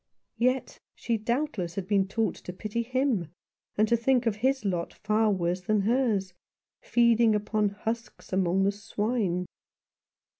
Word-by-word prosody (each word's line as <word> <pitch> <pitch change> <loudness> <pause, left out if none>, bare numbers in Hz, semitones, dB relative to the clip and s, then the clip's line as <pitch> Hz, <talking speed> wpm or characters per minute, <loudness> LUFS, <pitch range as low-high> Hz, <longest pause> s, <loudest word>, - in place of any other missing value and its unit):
Yet 255 +2 0 0.2
she 230 -1 -1
doubtless 225 - -2
had 195 -2 -4
been 195 -2 +2
taught 220 +3 0
to 180 - -9
pity 215 +4 -3
him, 250 - 0 0.5
and 215 +1 +4
to 235 - +3
think 245 +1 +2
his 235 +3 +1
lot 175 -3 -2
far 215 +1 +1
worse 180 -1 -1
than 210 +3 +1
hers, 215 -4 +1 0.5
feeding 235 -2 +4
upon 210 0 +1
husks 225 +1 -5
among 190 0 +2
the 200 - +3
swine. 205 -3 -1
215 Hz, 140 wpm, -28 LUFS, 195-235 Hz, 0.5 s, and